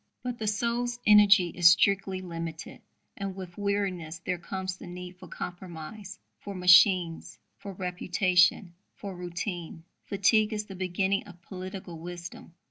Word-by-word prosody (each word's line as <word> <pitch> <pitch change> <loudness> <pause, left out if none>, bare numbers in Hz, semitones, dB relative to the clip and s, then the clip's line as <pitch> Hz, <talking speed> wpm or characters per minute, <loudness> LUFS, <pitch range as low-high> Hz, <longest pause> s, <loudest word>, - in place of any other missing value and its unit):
But 245 -1 -4
the 215 - -3
soul's 235 +3 -1
energy 205 -4 +6
is 170 0 +6
strictly 190 +1 +2
limited; 165 -3 -7 0.3
and 195 -1 -5
with 185 -2 -9
weariness 195 -5 -2
there 175 +1 -4
comes 185 +1 -4
the - - -11
need 180 0 -9
for - - -11
compromise, 180 +3 -8 0.2
for 200 - -8
'machines,' 180 -2 +4 0.2
for 200 - -8
reputation, 180 0 +1 0.2
for 200 -2 -7
routine. 175 -1 -5 0.2
Fatigue 210 +2 +2
is 210 0 -3
the 195 - -10
beginning 190 +1 -1
of 180 -3 -13
political 185 -2 -8
wisdom." 175 0 -9
185 Hz, 135 wpm, -28 LUFS, 175-200 Hz, 0.3 s, energy